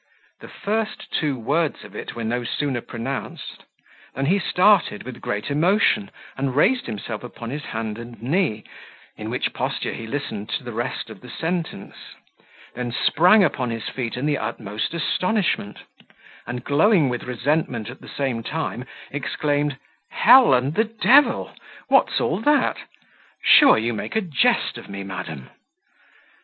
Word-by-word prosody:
The -, -, -11 dB
first 215 Hz, +1 st, -3 dB
two 145 Hz, -4 st, 0 dB
words 145 Hz, +6 st, -1 dB
of 105 Hz, -1 st, -13 dB
it -, -, -6 dB
were 115 Hz, -, -4 dB
no 120 Hz, +2 st, -1 dB
sooner 130 Hz, +1 st, -2 dB
pronounced, 120 Hz, +4 st, -6 dB, 0.5 s
than 135 Hz, -, -1 dB
he 190 Hz, +7 st, +3 dB
started, 185 Hz, -, +3 dB
with 125 Hz, -1 st, -9 dB
great 105 Hz, +6 st, -3 dB
emotion, 195 Hz, +6 st, +2 dB, 0.3 s
and 135 Hz, -1 st, -2 dB
raised 245 Hz, -, +3 dB
himself 110 Hz, 0 st, -5 dB
upon 120 Hz, -1 st, -7 dB
his 145 Hz, +1 st, -5 dB
hand 110 Hz, -1 st, -4 dB
and 120 Hz, -1 st, -10 dB
knee, 130 Hz, -, 0 dB, 0.5 s
in -, -, -6 dB
which -, -, -1 dB
posture -, -, -2 dB
he 115 Hz, -, -7 dB
listened 110 Hz, -6 st, -4 dB
to -, -, -2 dB
the 120 Hz, -2 st, -7 dB
rest 120 Hz, 0 st, -3 dB
of 105 Hz, -, -12 dB
the 125 Hz, -, -12 dB
sentence; 165 Hz, -, -4 dB, 0.8 s
then 120 Hz, -1 st, -4 dB
sprang 180 Hz, -, +5 dB
upon 130 Hz, -7 st, 0 dB
his 115 Hz, -1 st, -4 dB
feet 125 Hz, -2 st, -4 dB
in 130 Hz, -, -2 dB
the 150 Hz, -1 st, +1 dB
utmost 105 Hz, +8 st, -4 dB
astonishment, 180 Hz, -, 0 dB, 0.7 s
and, 120 Hz, 0 st, -5 dB
glowing 160 Hz, -, +4 dB
with 125 Hz, -1 st, -3 dB
resentment 125 Hz, -2 st, -1 dB
at 125 Hz, +2 st, -9 dB
the -, -, -12 dB
same 130 Hz, -5 st, -2 dB
time, 125 Hz, -1 st, -4 dB, 0.3 s
exclaimed, 145 Hz, 0 st, -1 dB, 0.3 s
"Hell 250 Hz, -, +7 dB
and 130 Hz, +4 st, 0 dB
the 220 Hz, +6 st, +2 dB
devil! 240 Hz, +6 st, +3 dB, 0.4 s
what's -, -, +4 dB
all -, -, 0 dB
that? 290 Hz, +5 st, +2 dB, 0.7 s
Sure 290 Hz, -2 st, +7 dB
you 115 Hz, +2 st, 0 dB
make 110 Hz, -, -5 dB
a 220 Hz, -, +3 dB
jest 165 Hz, -9 st, +1 dB
of -, -, -13 dB
me, 100 Hz, 0 st, -6 dB
madam!" 90 Hz, -8 st, -7 dB
135 Hz, 155 wpm, -23 LUFS, 115-170 Hz, 0.8 s, Hell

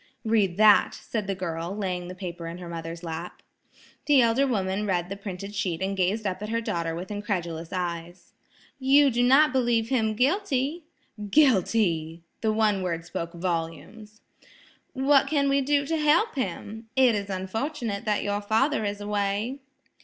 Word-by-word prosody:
"Read 205 Hz, -5 st, +2 dB
that," 215 Hz, -1 st, +5 dB
said 215 Hz, -4 st, -4 dB
the 195 Hz, -, -1 dB
girl, 175 Hz, +1 st, -4 dB
laying 180 Hz, -3 st, -3 dB
the 180 Hz, -, -8 dB
paper 175 Hz, -2 st, -6 dB
in 165 Hz, +1 st, -6 dB
her 180 Hz, -1 st, -8 dB
mother's 165 Hz, 0 st, -6 dB
lap. 165 Hz, +1 st, -6 dB, 0.6 s
The 290 Hz, -2 st, +6 dB
elder 240 Hz, +3 st, +3 dB
woman 200 Hz, -3 st, -1 dB
read 175 Hz, -2 st, 0 dB
the 195 Hz, -, -4 dB
printed 200 Hz, 0 st, -7 dB
sheet 180 Hz, -5 st, -2 dB
and 195 Hz, +1 st, -2 dB
gazed 195 Hz, +4 st, 0 dB
up 185 Hz, -1 st, -2 dB
at 210 Hz, -, -5 dB
her 230 Hz, +1 st, 0 dB
daughter 170 Hz, -7 st, -2 dB
with 180 Hz, +4 st, -6 dB
incredulous 175 Hz, -6 st, -3 dB
eyes. 175 Hz, -1 st, -5 dB, 0.5 s
"You 275 Hz, +1 st, +5 dB
do 240 Hz, +1 st, +1 dB
not 265 Hz, +3 st, +5 dB
believe 235 Hz, -3 st, +1 dB
him 220 Hz, -5 st, +1 dB
guilty?" 290 Hz, -, 0 dB, 0.4 s
"Guilty!" 185 Hz, -, +2 dB, 0.2 s
the 220 Hz, -, +1 dB
one 215 Hz, -2 st, +2 dB
word 170 Hz, -2 st, -3 dB
spoke 170 Hz, 0 st, -5 dB
volumes. 180 Hz, +5 st, -5 dB, 0.7 s
"What 270 Hz, +1 st, +3 dB
can 285 Hz, -2 st, +1 dB
we 275 Hz, 0 st, +3 dB
do 285 Hz, +1 st, +1 dB
to 325 Hz, +3 st, -1 dB
help 315 Hz, +9 st, +3 dB
him? 220 Hz, -, -5 dB
It 260 Hz, -3 st, +5 dB
is 200 Hz, -1 st, -3 dB
unfortunate 215 Hz, +4 st, -3 dB
that 210 Hz, -1 st, 0 dB
your 205 Hz, 0 st, -1 dB
father 220 Hz, +6 st, +1 dB
is 205 Hz, 0 st, -3 dB
away." 205 Hz, +5 st, -1 dB
205 Hz, 165 wpm, -26 LUFS, 180-250 Hz, 0.7 s, The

